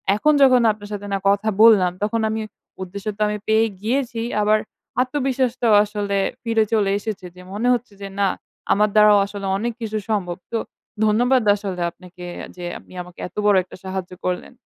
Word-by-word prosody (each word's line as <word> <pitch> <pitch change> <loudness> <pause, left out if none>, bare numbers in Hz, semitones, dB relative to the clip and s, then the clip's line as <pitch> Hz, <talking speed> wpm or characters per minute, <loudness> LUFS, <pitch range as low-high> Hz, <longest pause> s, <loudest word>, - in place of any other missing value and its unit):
এখন 300 +9 +3
যখন 255 -2 +6
আপনার 205 -1 -9
সাথে 205 0 -5
না - - +2
কথা 200 +2 +2
বললাম 210 -6 +7
তখন 225 +2 0
আমি 220 0 -2 0.4
উদ্দেশ্য 200 +3 -8
তো - - -8
আমি 210 0 -2
পেয়েই 220 +1 +3
গিয়েছি। 240 +1 -1 0.2
আবার 215 +1 +3 0.4
আত্মবিশ্বাসটাও 255 -3 0
আসলে 205 -1 -2 0.3
ফিরে 225 -2 +2
চলে 205 -3 +2
এসেছে। 205 -3 -5
যে 180 - -12
মনে 220 +4 -1
হচ্ছে 240 -3 -3
যে 200 - -5
না 200 - +3 0.5
আমার 210 +1 +3
দ্বারাও 210 -1 +7
আসলে 200 0 -7
অনেক 235 +4 -2
কিছু 220 -1 -2
সম্ভব। 180 -5 -1
তো 230 - 0 0.5
ধন্যবাদ 245 +4 +3
আসলে 195 -3 -5
আপনাকে 180 0 -12 0.3
যে 180 -1 -7
আপনি - - -18
আমাকে 180 0 -13
এত - - -20
বড় 205 -1 +5
একটা 180 - -13
সাহায্য 190 -1 -5
করলেন। 180 +6 -3
210 Hz, 175 wpm, -21 LUFS, 200-230 Hz, 0.5 s, বললাম